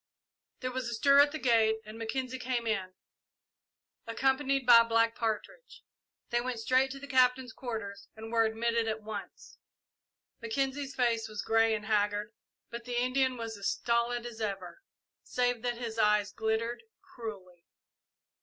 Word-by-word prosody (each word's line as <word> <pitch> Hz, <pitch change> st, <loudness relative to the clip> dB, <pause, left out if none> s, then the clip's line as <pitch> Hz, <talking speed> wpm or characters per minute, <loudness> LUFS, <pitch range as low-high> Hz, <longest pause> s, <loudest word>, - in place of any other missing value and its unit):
There 255 Hz, -1 st, -2 dB
was 255 Hz, -2 st, -3 dB
a 235 Hz, -, -3 dB
stir 280 Hz, +4 st, +5 dB
at 290 Hz, 0 st, +6 dB
the 310 Hz, -, -4 dB
gate 225 Hz, -5 st, +3 dB
and 215 Hz, +1 st, -9 dB
Mackenzie 255 Hz, +3 st, -4 dB
came 250 Hz, -2 st, -2 dB
in, 190 Hz, -4 st, -2 dB, 1.1 s
accompanied 270 Hz, +2 st, +1 dB
by 235 Hz, -2 st, +9 dB
Black 230 Hz, 0 st, +2 dB
Partridge. 245 Hz, -, -4 dB, 0.5 s
They 240 Hz, 0 st, +2 dB
went 250 Hz, -1 st, -3 dB
straight 255 Hz, +4 st, +2 dB
to 275 Hz, +1 st, -7 dB
the 280 Hz, -, -8 dB
Captain's 255 Hz, -2 st, +2 dB
quarters 205 Hz, -5 st, -6 dB
and 220 Hz, +1 st, -9 dB
were 230 Hz, -1 st, +4 dB
admitted 230 Hz, +1 st, 0 dB
at 220 Hz, 0 st, -3 dB
once. 215 Hz, -1 st, -8 dB, 0.8 s
Mackenzie's 270 Hz, +4 st, -2 dB
face 230 Hz, -3 st, +1 dB
was 215 Hz, -1 st, -5 dB
grey 225 Hz, 0 st, +3 dB
and 210 Hz, -1 st, -6 dB
haggard, 210 Hz, 0 st, 0 dB, 0.4 s
but 235 Hz, 0 st, -7 dB
the 245 Hz, -1 st, -1 dB
Indian 255 Hz, +1 st, +1 dB
was 225 Hz, -1 st, -5 dB
as 200 Hz, -, 0 dB
stolid 235 Hz, 0 st, 0 dB
as 230 Hz, -2 st, -8 dB
ever, 195 Hz, -, -4 dB, 0.4 s
save 245 Hz, -2 st, 0 dB
that 240 Hz, -1 st, -2 dB
his 230 Hz, -2 st, -5 dB
eyes 210 Hz, -1 st, +3 dB
glittered 220 Hz, +2 st, -1 dB, 0.2 s
cruelly. 205 Hz, -, -9 dB
230 Hz, 155 wpm, -30 LUFS, 220-255 Hz, 1.1 s, by